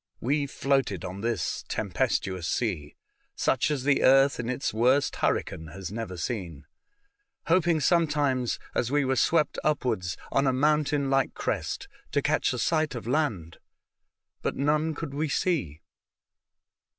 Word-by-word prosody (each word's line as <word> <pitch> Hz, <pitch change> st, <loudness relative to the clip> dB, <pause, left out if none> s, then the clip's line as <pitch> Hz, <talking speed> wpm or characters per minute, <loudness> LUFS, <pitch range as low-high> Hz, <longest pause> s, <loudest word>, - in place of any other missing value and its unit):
We 140 Hz, +3 st, 0 dB
floated 135 Hz, -9 st, 0 dB
on 95 Hz, +2 st, -6 dB
this 115 Hz, +1 st, -2 dB
tempestuous 95 Hz, -3 st, -1 dB
sea, 80 Hz, -7 st, -2 dB, 0.4 s
such 130 Hz, -, +1 dB
as 145 Hz, -4 st, -1 dB
the 140 Hz, 0 st, +3 dB
earth 135 Hz, +1 st, +5 dB
in 120 Hz, 0 st, -3 dB
its 125 Hz, +2 st, -2 dB
worst 125 Hz, +5 st, +2 dB
hurricane 80 Hz, -, -1 dB
has 95 Hz, -1 st, -6 dB
never 105 Hz, -4 st, -5 dB
seen, 85 Hz, -, -4 dB, 0.8 s
hoping 170 Hz, -1 st, +3 dB
some 170 Hz, +2 st, +3 dB
times, 135 Hz, -5 st, 0 dB, 0.2 s
as 120 Hz, -, 0 dB
we 145 Hz, -1 st, +2 dB
were 130 Hz, 0 st, +1 dB
swept 155 Hz, +5 st, +2 dB
upwards 115 Hz, -, 0 dB
on 135 Hz, 0 st, +2 dB
a 130 Hz, -, +3 dB
moun 150 Hz, +3 st, +3 dB
tain 140 Hz, -1 st, -1 dB
like 135 Hz, -1 st, +1 dB
crest, -, -, -3 dB, 0.3 s
to -, -, +2 dB
catch -, -, +1 dB
a 125 Hz, -, -3 dB
sight 155 Hz, +3 st, +1 dB
of 120 Hz, -, -6 dB
land, 115 Hz, -, -1 dB, 0.8 s
but -, -, -2 dB
none 150 Hz, +3 st, +1 dB
could 145 Hz, -2 st, -5 dB
we 150 Hz, +2 st, -1 dB
see. 135 Hz, -, -1 dB
135 Hz, 150 wpm, -27 LUFS, 110-150 Hz, 0.8 s, earth